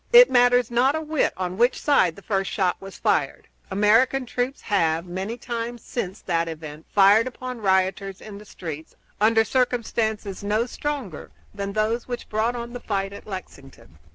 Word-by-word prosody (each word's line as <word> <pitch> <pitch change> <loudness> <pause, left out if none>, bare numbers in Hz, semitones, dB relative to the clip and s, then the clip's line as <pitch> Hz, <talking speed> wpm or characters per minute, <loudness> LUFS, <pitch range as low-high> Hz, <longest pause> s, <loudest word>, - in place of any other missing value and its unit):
It - - +9
matters 245 -1 +4
not 255 +5 +3
a 315 - -1
whit 310 -1 0
on 185 +1 -4
which 245 +2 +3
side 185 - +3
the 200 - -14
first 195 -2 -1
shot 185 -4 +1
was 195 0 -10
fired. - - 0 0.2
American 225 +7 +3
troops 250 +3 -3
have, 165 -5 +1
many 190 +6 -4
times 240 -1 -5
since 195 -4 -4
that 170 -2 0
event, 155 -1 -8
fired 205 +4 +5
upon 255 -1 -7
rioters 190 0 +1
in 205 -2 -10
the 210 - -13
streets, 160 -5 -8 0.3
under 225 +1 +5
circumstances 220 -5 -1
no 210 +3 +1
stronger 260 - -5 0.2
than 200 -1 -4
those 220 +3 0
which 245 -1 -6
brought 220 +3 0
on 235 0 -6
the 245 - -5
fight 195 -3 -2
at 200 - -11
Lexington. 135 - -10
215 Hz, 170 wpm, -24 LUFS, 190-245 Hz, 0.3 s, It